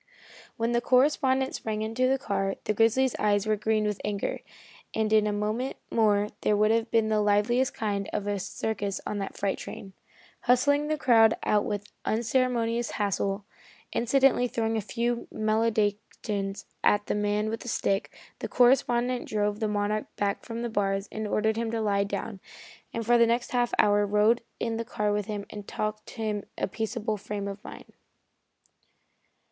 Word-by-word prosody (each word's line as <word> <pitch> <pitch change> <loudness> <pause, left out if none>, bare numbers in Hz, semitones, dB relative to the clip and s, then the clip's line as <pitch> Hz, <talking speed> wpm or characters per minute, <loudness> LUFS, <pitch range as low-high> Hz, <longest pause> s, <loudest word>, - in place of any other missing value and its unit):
When 230 +1 0
the 240 0 +2
correspondent 265 +1 +3
sprang 215 -1 -3
into 225 +4 0
the 265 +1 +2
car, 195 -5 -1
the 215 - 0
grizzly's 230 +4 +3
eyes 205 -1 +2
were 215 0 +2
green 215 +1 +1
with 210 -2 -2
anger, 205 -1 -2 0.6
and 220 -1 +1
in 215 -1 +5
a - - +1
moment 215 +5 -2
more 210 -2 +3
there 210 - +2
would 215 +1 +4
have 225 +1 +1
been 225 -1 +2
the 215 -1 +2
liveliest 210 +5 +2
kind 200 -2 -2
of 210 - -2
a 205 -1 -1
circus 200 0 -3
on 210 - -3
that 195 - -5
freight 200 -1 -1
train. 195 -1 -8 0.5
Hustling 285 +4 +3
the 310 0 0
crowd 225 -6 +5
out 210 -1 +2
with 205 0 -4
unceremonious 235 0 0
haste 200 -2 -1 0.7
incidentally 255 +1 +3
throwing 225 -1 -1
a 220 - 0
few 235 +3 -2
maledictions 215 -2 -1 0.2
at 205 0 +3
the - - -1
man 210 +1 0
with 225 - -3
the - - -10
stick 200 -3 0 0.3
the - - -3
correspondent 245 0 +3
drove 210 -1 -1
the 220 - 0
Monarch 210 +1 -1
back 200 -1 -1
from 230 0 -5
the 240 - -2
bars, 195 -1 0
and 220 0 -3
ordered 220 +1 +1
him 230 0 -1
to 230 0 -2
lie 200 -2 +1
down, 205 0 -4 0.5
and 230 -1 -4
for 240 +1 +4
the 235 - +6
next 235 +1 0
half 245 -1 +1
hour 205 0 +4
rode 210 +3 +3 0.2
in 230 -1 -1
the 230 - -2
car 210 -2 -1
with 205 -1 -1
him 205 -2 -4
and 205 -1 -8
talked 215 0 -4
him 215 -3 -2
into 205 - -8
a - - 0
peaceable 220 +1 -3
frame 200 0 -5
of 200 +1 -7
mind. - - -11
215 Hz, 175 wpm, -27 LUFS, 205-235 Hz, 0.7 s, the